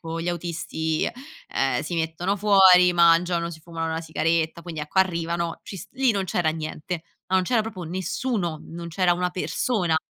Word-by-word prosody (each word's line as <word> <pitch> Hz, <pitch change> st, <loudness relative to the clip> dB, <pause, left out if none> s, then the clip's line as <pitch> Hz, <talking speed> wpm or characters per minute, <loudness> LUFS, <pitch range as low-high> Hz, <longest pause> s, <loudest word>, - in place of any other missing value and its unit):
con 165 Hz, 0 st, -5 dB
gli 170 Hz, -, -3 dB
autisti, 160 Hz, -2 st, -2 dB, 0.4 s
ehm, -, -, 0 dB
si 175 Hz, -, -4 dB
mettono 165 Hz, +5 st, -1 dB
fuori, 190 Hz, -3 st, +6 dB
mangiano, 170 Hz, 0 st, +3 dB
si 160 Hz, -2 st, -10 dB
fumano 165 Hz, 0 st, -4 dB
la 160 Hz, -, -2 dB
sigaretta, 165 Hz, +1 st, 0 dB
quindi 165 Hz, -3 st, -6 dB
ecco 150 Hz, +5 st, -3 dB
arrivano, 170 Hz, -2 st, 0 dB
ci 195 Hz, -, -7 dB
s 170 Hz, -, -9 dB
lì 265 Hz, -1 st, +2 dB
non 195 Hz, -2 st, -1 dB
c'era 175 Hz, -3 st, 0 dB
niente. 160 Hz, +1 st, -5 dB, 0.2 s
Ma 190 Hz, -, +2 dB
non 185 Hz, -, +2 dB
c'era 230 Hz, +4 st, +2 dB
proprio 215 Hz, -5 st, -7 dB
nessuno, 180 Hz, 0 st, -2 dB
non 170 Hz, +1 st, -8 dB
c'era 175 Hz, +1 st, +2 dB
una 180 Hz, 0 st, -1 dB
persona. 180 Hz, -2 st, 0 dB
170 Hz, 180 wpm, -24 LUFS, 165-185 Hz, 0.4 s, fuori